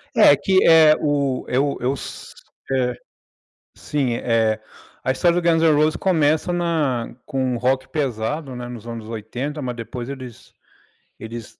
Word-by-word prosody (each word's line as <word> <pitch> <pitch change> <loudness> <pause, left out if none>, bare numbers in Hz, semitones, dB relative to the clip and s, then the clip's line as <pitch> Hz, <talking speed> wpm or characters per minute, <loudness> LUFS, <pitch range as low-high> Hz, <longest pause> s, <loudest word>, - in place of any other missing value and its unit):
É, - - +7
que 190 -1 +2
é 160 -2 +7
o 140 -3 0
eu 140 +2 0
eu 130 +3 0
s - - -8 0.4
é, 125 -2 +1 0.8
sim, 135 -5 -2
eh, 115 -2 +1 0.5
a 130 - +1
história 175 +5 +2
do 170 - -4
Guns 165 -1 +3
and 160 -2 +5
Roses 155 +1 +2
começa 160 -2 +1
na 155 -9 -1
com 135 -3 -2
um 125 -2 -1
rock 130 +2 0
pesado, 135 0 -3
né, 120 0 -6
nos 120 -2 -9
anos 115 -2 -7
80, 120 +7 -5
mas 125 -1 -4
depois 120 +1 -6
eles 130 -4 -9 0.7
eles 115 -1 -9
130 Hz, 155 wpm, -21 LUFS, 120-155 Hz, 0.8 s, É